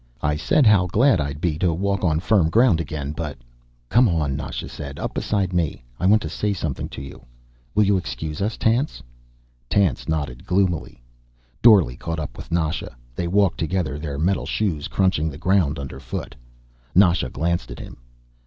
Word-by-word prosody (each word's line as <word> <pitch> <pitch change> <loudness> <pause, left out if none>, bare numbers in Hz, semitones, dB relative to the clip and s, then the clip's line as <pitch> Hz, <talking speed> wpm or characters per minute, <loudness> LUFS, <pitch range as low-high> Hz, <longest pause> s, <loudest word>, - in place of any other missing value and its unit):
"I 75 -1 +2
said 125 - +2
how 100 -4 +5
glad 110 - +3
I'd 70 0 -4
be 80 -2 -1
to 90 -1 +2
walk 100 +4 -1
on 80 -3 +2
firm 95 -3 +3
ground 110 -4 +4
again, 75 -3 -4
but 75 -2 -5 0.3
" - - -37
"Come 120 -1 +5
on," 75 -5 0
Nasha 70 -2 -5
said. 70 -2 -8
"Up - - -4
beside 95 -3 -1
me. 80 -7 -1 0.2
I 90 - +1
want 105 +2 +5
to - - -3
say 100 +6 -1
something 80 -7 -4
to 70 - -7
you. 70 - -11 0.5
Will 105 - +5
you 100 -1 +3
excuse 75 0 -5
us, 110 +3 -1
Tance?" 115 - 0 0.7
Tance 95 -10 +1
nodded 70 -6 -2
gloomily. 90 -9 -1 0.6
Dorle 95 - +6
caught 80 -1 -3
up 75 - -5
with - - -10
Nasha. 80 -6 -1 0.2
They 85 - -2
walked 100 0 +2
together, 80 -4 -1
their 75 -2 -4
metal 90 +6 0
shoes 85 -9 -1
crunching 90 -5 +1
the 70 - -8
ground 90 -3 +2
underfoot. 65 -2 -6 0.6
Nasha 90 -8 +4
glanced 85 +6 -1
at - - -8
him. - - -10
85 Hz, 180 wpm, -23 LUFS, 75-95 Hz, 0.7 s, Dorle